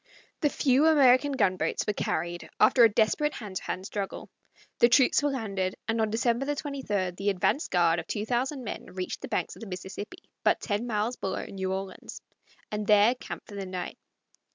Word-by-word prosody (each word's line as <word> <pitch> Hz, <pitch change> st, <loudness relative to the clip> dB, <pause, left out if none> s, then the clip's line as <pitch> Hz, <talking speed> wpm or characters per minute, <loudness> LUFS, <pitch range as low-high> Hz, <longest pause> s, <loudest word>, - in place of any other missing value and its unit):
The 295 Hz, -, +2 dB
few 280 Hz, +2 st, +3 dB
American 285 Hz, -2 st, +5 dB
gunboats 185 Hz, -10 st, 0 dB
were 210 Hz, -, 0 dB
carried 175 Hz, -2 st, -3 dB
after 245 Hz, -, +6 dB
a 230 Hz, -, +8 dB
desperate 220 Hz, +8 st, +1 dB
hand 200 Hz, -4 st, -6 dB
to -, -, -6 dB
hand 185 Hz, -, -4 dB
struggle, 200 Hz, -1 st, -5 dB, 0.5 s
the 235 Hz, -, +6 dB
troops 265 Hz, +3 st, +5 dB
were 290 Hz, -, +1 dB
landed, 195 Hz, -8 st, -2 dB
and 225 Hz, 0 st, +1 dB
on 220 Hz, -, +1 dB
December 240 Hz, +5 st, 0 dB
23 255 Hz, -11 st, -2 dB
the 195 Hz, +3 st, -2 dB
advance 200 Hz, -, +1 dB
guard 170 Hz, -1 st, +3 dB
of -, -, -7 dB
two 210 Hz, 0 st, -2 dB
thousand 255 Hz, +3 st, -1 dB
men 215 Hz, -, -6 dB
reached 185 Hz, -1 st, -4 dB
the -, -, -5 dB
banks -, -, -2 dB
of -, -, -14 dB
the 225 Hz, -, -8 dB
Mississippi, 195 Hz, -, -7 dB, 0.2 s
but -, -, +3 dB
ten 215 Hz, +2 st, -2 dB
miles 220 Hz, +2 st, -1 dB
below 190 Hz, -1 st, -3 dB
New 190 Hz, -1 st, -4 dB
Orleans, 190 Hz, 0 st, -6 dB, 0.5 s
and 210 Hz, -1 st, -3 dB
there 210 Hz, +3 st, +6 dB
camped 255 Hz, -, -9 dB
for 210 Hz, -, -11 dB
the 195 Hz, -1 st, -5 dB
night. 185 Hz, -1 st, -5 dB
215 Hz, 190 wpm, -28 LUFS, 190-255 Hz, 0.5 s, a